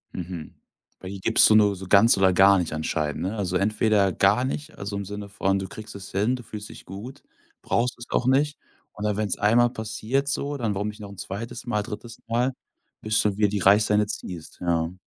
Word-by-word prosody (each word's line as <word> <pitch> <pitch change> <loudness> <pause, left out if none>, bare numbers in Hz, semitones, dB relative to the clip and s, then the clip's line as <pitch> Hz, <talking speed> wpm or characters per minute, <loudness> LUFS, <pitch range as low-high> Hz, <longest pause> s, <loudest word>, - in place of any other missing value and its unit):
Mhm, 90 -3 -6 0.5
bei 95 - -8
dir 100 -1 -7
gibst 110 +3 +5
du 110 - +6
nur 105 -2 +5
so 95 0 -9
ganz 100 +2 +6
oder 95 -1 +4
gar 95 +1 +6
nicht 85 -3 -2
anscheinend, 80 0 -2
ne? 100 +4 -2
Also, 95 -3 -1
entweder 105 -1 +2
gar 105 +6 +3
nicht, 145 +2 -5
also 100 +1 -5
im 100 -1 -4
Sinne 105 +1 -6
von, 95 0 0
du 95 0 -4
kriegst 110 +2 -10
es 95 -1 -9
hin, 105 +6 +1
du 125 - -9
fühlst 105 -1 -8
dich - - -12
gut, 105 +8 -9 0.4
brauchst 120 +1 0
es 120 - -9
auch 125 - +1
nicht, 145 +3 +2 0.3
oder 105 -1 -2
wenn's 105 -2 -1
einmal 120 +3 +4
passiert 110 +5 -2
so, 140 +1 -1
dann 115 -6 -2
warum 105 +2 -2
nicht 105 +1 -10
noch 100 -1 -8
'n 100 - -12
2. 115 +5 -6
Mal, 105 -3 0
3. 115 +2 -8
Mal, 120 +3 +1 0.5
bis 110 0 +1
du 105 -2 +1
wieder 105 -1 +4
die 105 0 -2
Reisleine 105 +2 +4
ziehst, 90 -5 -7
ja. 85 0 0
105 Hz, 215 wpm, -25 LUFS, 95-115 Hz, 0.5 s, du